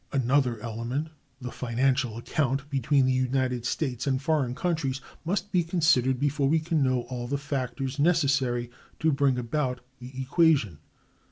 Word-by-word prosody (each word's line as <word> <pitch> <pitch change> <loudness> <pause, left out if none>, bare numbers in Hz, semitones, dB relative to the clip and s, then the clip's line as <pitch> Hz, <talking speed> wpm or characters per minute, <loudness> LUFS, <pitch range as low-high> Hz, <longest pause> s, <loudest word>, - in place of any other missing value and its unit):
Another 130 -2 +1
element, 120 +7 -3 0.3
the 125 -1 -6
"financial 125 -1 0
account" 135 +2 -1
between 135 0 +2
the 130 - +2
United 130 -2 0
States 130 -3 -2
and 130 -1 +1
foreign 140 -4 0
countries, 155 -6 -1 0.2
must 195 +4 -2
be 180 - +3
considered 155 -7 +2
before 145 -1 +1
we 160 +2 +3
can 160 -1 0
know 130 -2 +2
all 120 0 -6
the 140 +3 -1
factors 135 -1 -3
necessary 140 -7 +2 0.3
to 160 - +2
bring 140 -2 +2
about 125 +1 -2 0.2
the 125 +1 -9
equation. 135 - +2
135 Hz, 150 wpm, -27 LUFS, 125-150 Hz, 0.3 s, be